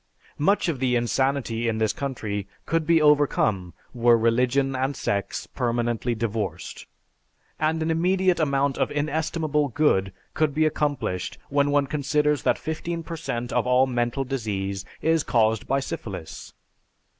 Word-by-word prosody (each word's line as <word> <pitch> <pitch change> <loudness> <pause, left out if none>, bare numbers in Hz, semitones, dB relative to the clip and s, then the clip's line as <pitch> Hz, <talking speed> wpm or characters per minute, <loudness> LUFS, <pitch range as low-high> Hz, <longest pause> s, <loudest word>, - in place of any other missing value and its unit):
Much 195 +8 +2
of 155 -6 -1
the 125 -1 +1
insanity 120 -1 0
in 110 -1 0
this 110 -1 +1
country 110 -8 -4 0.2
could 165 -1 0
be 165 -1 +5
overcome 140 - +2 0.2
were 120 -1 +4
religion 125 +4 +2
and 135 +2 -1
sex 100 -4 -2
permanently 120 0 -1
divorced; 105 -6 -4 0.7
and 160 +1 +1
an 160 - 0
immediate 180 +2 +2
amount 140 -2 +1
of - - +1
inestimable 150 0 0
good 115 -9 +1 0.2
could 150 -2 0
be 155 0 +3
accomplished 145 -12 -1
when 140 0 +2
one 145 0 +3
considers 150 0 0
that - - +2
fifteen 165 +1 -4
per 165 - -6
cent 120 -6 -4
of - - +1
all 125 +1 +4
mental 120 +1 -1
disease 100 -7 -3 0.2
is 160 0 +3
caused 110 -4 +1
by 135 - +2
syphilis. 100 -10 -7
135 Hz, 145 wpm, -25 LUFS, 115-150 Hz, 0.7 s, be